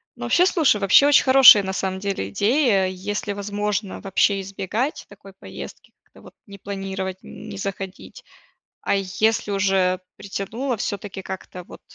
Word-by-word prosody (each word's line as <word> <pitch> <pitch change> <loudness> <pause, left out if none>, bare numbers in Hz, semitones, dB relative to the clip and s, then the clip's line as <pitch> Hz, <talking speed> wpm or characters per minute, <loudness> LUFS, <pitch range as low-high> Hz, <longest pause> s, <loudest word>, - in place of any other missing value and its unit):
Ну - - -9
вообще, 360 - +3
слушай, 315 - +2
вообще 205 +8 +5
очень 290 - +5
хорошая, 260 -6 +8
на 190 0 -4
самом 190 -1 -3
деле, 195 - -3
идея. 205 - +2
Если 205 +3 -4
возможно 205 0 -3
вообще 195 +1 +1
избегать 195 - -4
такой 200 -1 -15
поездки, 95 - -11
как-то - - -21
вот - - -15
не 200 -1 -12
планировать, 195 -1 -5
не 205 -2 -10
заходить. 195 -1 -7 0.6
А - - 0
если 205 +3 0
уже 190 -2 +1 0.2
притянуло, 220 +6 -4
всё-таки 200 -1 -5
как-то 185 -1 -8
вот - - -14
200 Hz, 145 wpm, -22 LUFS, 190-210 Hz, 0.6 s, хорошая